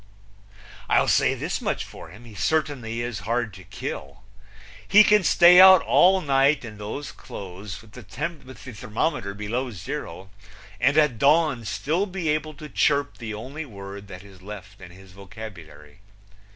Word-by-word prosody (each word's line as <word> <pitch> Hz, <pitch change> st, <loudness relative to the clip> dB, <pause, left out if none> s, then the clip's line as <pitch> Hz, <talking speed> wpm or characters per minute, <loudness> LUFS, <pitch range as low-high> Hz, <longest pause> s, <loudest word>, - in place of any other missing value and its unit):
I'll -, -, +3 dB
say -, -, +3 dB
this -, -, -4 dB
much -, -, -2 dB
for -, -, -12 dB
him: 105 Hz, +8 st, -14 dB
He 115 Hz, -, -13 dB
certainly 125 Hz, -4 st, -1 dB
is 120 Hz, -4 st, -4 dB
hard 115 Hz, -1 st, -2 dB
to 95 Hz, +1 st, -12 dB
kill. 90 Hz, -2 st, -7 dB, 0.6 s
He 210 Hz, +2 st, +7 dB
can 210 Hz, -1 st, +4 dB
stay 175 Hz, +1 st, +7 dB
out 190 Hz, -2 st, +9 dB
all 190 Hz, +1 st, +4 dB
night 140 Hz, -2 st, +2 dB
in 105 Hz, -2 st, -10 dB
those 110 Hz, +8 st, -6 dB
clothes, 95 Hz, +2 st, -9 dB
with 110 Hz, -, -18 dB
the 125 Hz, -, -11 dB
thermometer 130 Hz, -, -5 dB
below 115 Hz, +5 st, -3 dB
zero, 95 Hz, -1 st, -7 dB, 0.5 s
and 140 Hz, +6 st, +2 dB
at 150 Hz, -7 st, +3 dB
dawn 145 Hz, -4 st, +3 dB
still 165 Hz, -, -1 dB
be 185 Hz, -4 st, -3 dB
able 155 Hz, 0 st, -2 dB
to 150 Hz, +2 st, -10 dB
chirp 145 Hz, -1 st, 0 dB
the 110 Hz, -3 st, -5 dB
only 135 Hz, +9 st, -7 dB
word 100 Hz, -5 st, -10 dB
that 90 Hz, -1 st, -10 dB
is 95 Hz, -2 st, -16 dB
left 95 Hz, -1 st, -11 dB
in 90 Hz, -, -10 dB
his 95 Hz, +1 st, -16 dB
vocabulary. 90 Hz, -6 st, -12 dB
115 Hz, 155 wpm, -24 LUFS, 100-150 Hz, 0.6 s, out